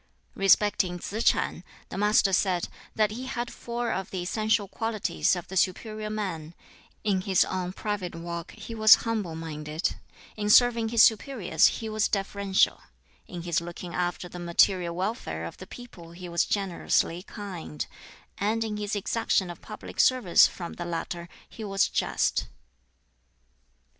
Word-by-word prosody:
Respecting 195 -2 +3
Tsz 215 +6 -4
ch'an, 170 - +1 0.3
the - - -6
Master 210 -1 +4
said 185 -2 +1 0.3
that 215 -1 +2
he 250 +4 -6
had 240 -2 -4
four 235 0 -3
of 190 0 -3
the 185 -2 -4
essential 215 +2 +1
qualities 220 -2 0
of 175 - -6
the 190 - -8
'superior 215 +4 0
man': 175 -7 -4 0.5
in 195 -3 +1
his 190 -1 +3
own 180 -1 -3
private 195 -3 -4
walk 170 0 -6
he 220 +1 -9
was 220 -1 +8
humble 210 -8 -2
minded; 155 0 -3 0.4
in 210 -1 -2
serving 235 0 +5
his 230 -1 +6
superiors 215 - +3
he 225 - -3
was 215 -1 +1
deferential; 195 -1 +1 0.5
in 175 -2 -7
his 170 -1 0
looking 175 0 -7
after 180 0 -2
the 175 0 -9
material 175 0 +2
welfare 180 - -3
of 85 - -8
the 185 - -10
people 180 -10 -11
he 180 +1 -8
was 170 0 +1
generously 180 -3 0
kind; 185 - -6 0.5
and 220 +3 +1
in 215 -2 -3
his 210 0 -2
exaction 205 -3 0
of 170 - -12
public 215 - -9
service 250 -9 +6
from 170 -2 -7
the 175 - -6
latter 170 0 -4 0.2
he 225 - -9
was 195 -1 +2
just. - - 0
195 Hz, 155 wpm, -27 LUFS, 175-215 Hz, 0.5 s, was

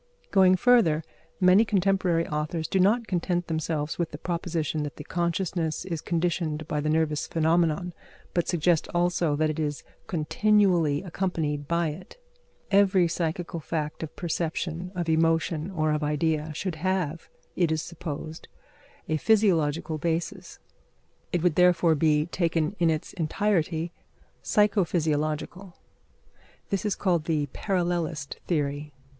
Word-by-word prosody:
Going 190 -2 +6
further, 185 -8 +4 0.4
many 185 +3 +6
contemporary 190 -5 +1
authors 155 +1 -2
do 190 - 0
not 220 +6 +3
content 175 -2 -1
themselves 160 -1 -2
with 170 - 0
the 145 - -8
proposition 165 -2 -2
that 145 -3 -4
the 150 - -8
consciousness 170 -1 -2
is 165 -5 -4
conditioned 165 -3 -1
by 150 -1 -1
the 155 - -1
nervous 155 -1 +1
phenomenon, 165 +2 +1 0.4
but 175 - 0
suggest 170 -1 +2
also 175 -3 +2
that 155 +1 +1
it 155 - -5
is 145 -2 -2 0.2
continually 175 -2 +2
accompanied 165 -6 -2
by 170 0 +1
it. 180 - -10 0.5
Every 195 -3 +4
psychical 170 +1 -3
fact 150 -1 -4
of 160 -2 -6
perception, 170 +1 -3
of 175 -2 -2
emotion, 165 0 +1
or 155 -5 0
of 150 0 0
idea 150 +1 0
should 180 0 -3
have, 170 -2 -2 0.3
it 175 -3 +2
is 160 0 0
supposed, 160 -1 -7 0.6
a 155 - 0
physiological 165 -6 +2
basis. 170 +4 -3 0.7
It 175 -3 0
would 180 -3 +3
therefore 175 -1 +4
be, 150 0 +2
taken 170 0 -1
in 170 -1 +3
its 155 -1 -2
entirety, 170 -2 0 0.5
psycho 210 -1 +3
physiological. 160 +3 -2 1.0
This 195 +1 -1
is 210 - +1
called 175 -5 0
the 155 -3 0
parallelist 175 -6 -2
theory. 145 -2 -1
165 Hz, 135 wpm, -26 LUFS, 155-180 Hz, 1.0 s, Going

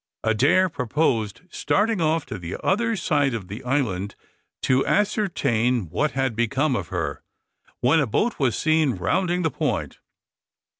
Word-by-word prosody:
Adair 135 - +3
proposed 120 - -1
starting 210 -2 +1
off 160 -1 +1
to - - -6
the 85 0 -5
other 230 +3 +1
side 145 - +1
of 100 -5 -6
the 105 +6 -7
island 115 -8 -1 0.5
to 130 +1 +3
ascertain 125 - 0
what 150 - 0
had 135 -3 -1
become 130 +5 +1
of 95 -8 -3
her, - - -3 0.6
when 145 +7 +4
a 145 - +1
boat 215 - 0
was 130 -6 +1
seen 155 -5 +2
rounding 180 - 0
the 160 - +1
point. - - -2
135 Hz, 145 wpm, -24 LUFS, 115-165 Hz, 0.6 s, when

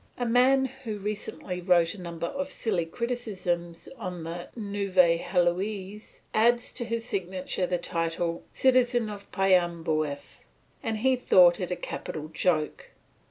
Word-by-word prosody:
A 245 - -1
man 255 +3 +4
who 255 -4 -6
recently 200 -3 -4
wrote 175 -2 +3
a 200 - -10
number 170 -1 -4
of 280 +9 -3
silly 185 -11 -1
criticisms 180 -7 -3
on 180 -5 -5
the 170 +2 -6
"Nouvelle 195 -6 +2
Heloise" 190 +4 -1
added 235 +2 +4
to 240 - -4
his 230 0 -3
signature 185 -3 -2
the 180 0 0
title 170 0 -2
"Citizen 245 -3 +3
of 200 -1 -10
Paimboeuf," 165 -6 0 0.4
and 220 -1 -2
he 260 +4 +3
thought 180 -7 +6
it 180 - -3
a 180 - -1
capital 155 -1 -6
joke. 155 -2 0
185 Hz, 135 wpm, -28 LUFS, 170-225 Hz, 0.4 s, thought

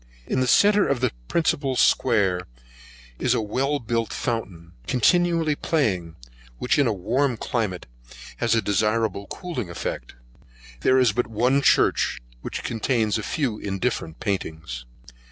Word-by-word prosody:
In - - -1
the 130 - +1
centre 205 +7 +5
of 140 - 0
the 130 - +1 0.2
principal 145 -5 0
square, 100 -9 +2 0.7
is - - +2
a - - +1
well 130 +7 0
built 115 -3 -2
fountain, 95 -9 -4 0.2
continually 165 - +3
playing, 95 - -1 0.4
which, 125 - +1
in 140 - +4
a - - +2
warm 120 +6 0
climate, 105 -7 -2 0.5
has 115 -1 +1
a 115 - +1
desirable 105 0 0
cooling 165 - -5
effect. 85 - -5 0.6
There 130 - +3
is 125 -4 +4
but 120 +2 -1
one 125 +5 +2
church, - - +3 0.2
which - - -5
contains 115 -1 0
a - - -3
few 120 -2 -2
indifferent 95 -4 -3
paintings. 80 - -4
115 Hz, 135 wpm, -24 LUFS, 100-135 Hz, 0.7 s, centre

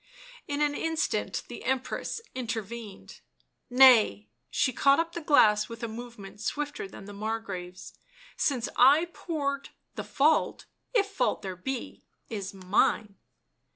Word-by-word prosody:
In 285 0 -2
an 295 -1 +2
instant 320 +1 -1
the - - -9
Empress 265 - -2
intervened. 230 -3 -6 0.3
" - - -51
Nay 210 - +6
" 120 - -50
— - - -51
she 260 - +1
caught 275 +4 +4
up 335 0 -1
the 340 - -5
glass 215 -8 +4
with 230 0 -8
a - - -1
movement 220 -3 -9
swifter 290 -3 -3
than 195 - -11
the 205 - -9
Margrave's 200 -4 -5
— - - -25
" - - -24
since 250 -4 -2
I 290 +7 +6
poured, 280 -4 -3 0.2
the - - -5
fault 305 +3 +1
— - - -48
if 415 -4 +4
fault 395 -12 -1
there 190 -1 -4
be 240 +7 -5 0.2
— - - -41
is 200 -3 -4
mine." 195 +2 +1
235 Hz, 160 wpm, -28 LUFS, 205-285 Hz, 0.3 s, Nay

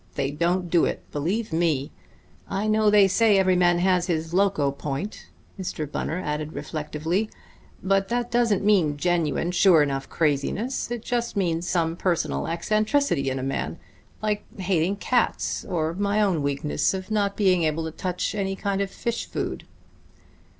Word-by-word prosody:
They 140 -1 -1
don't 175 +4 0
do 170 - +4
it - - -3
believe 180 +7 -2
me. 160 -5 +1 0.6
I 195 +2 -1
know 215 0 +3
they 205 -1 +6
say 205 +1 +4
every 185 -1 +3
man 175 -1 +4
has 180 0 +2
his 165 -1 -2
loco 185 -7 +2
point," 140 +8 -5 0.3
Mr. 175 -4 -3
Bunner 155 +3 -3
added 150 -3 -3
reflectively, 160 +6 -2 0.5
"but 195 0 +2
that 240 +2 -2
doesn't 235 -5 +2
mean 175 -9 +3
genuine, 170 0 0
sure 180 -3 +5
enough 135 -1 -3
craziness; 165 - -1
it 240 -2 -4
just 240 -3 -2
means 175 -2 0
some 165 -2 +1
personal 175 -1 -1
eccentricity 215 - +1
in 130 - -2
a 130 - -3
man... 135 +1 -3 0.5
like 210 -1 0 0.2
hating 185 0 +1
cats... 240 +4 0
or 160 -2 -1
my 200 +3 0
own 190 -7 +2
weakness 140 +5 0
of 190 +2 -6
not 200 -2 0
being 185 -4 +3
able 160 0 0
to 160 - -4
touch 180 +2 -3
any 195 -2 -2
kind 200 0 -1
of 200 - -1
fish 235 +3 -3
food." - - -4
180 Hz, 160 wpm, -25 LUFS, 160-205 Hz, 0.6 s, they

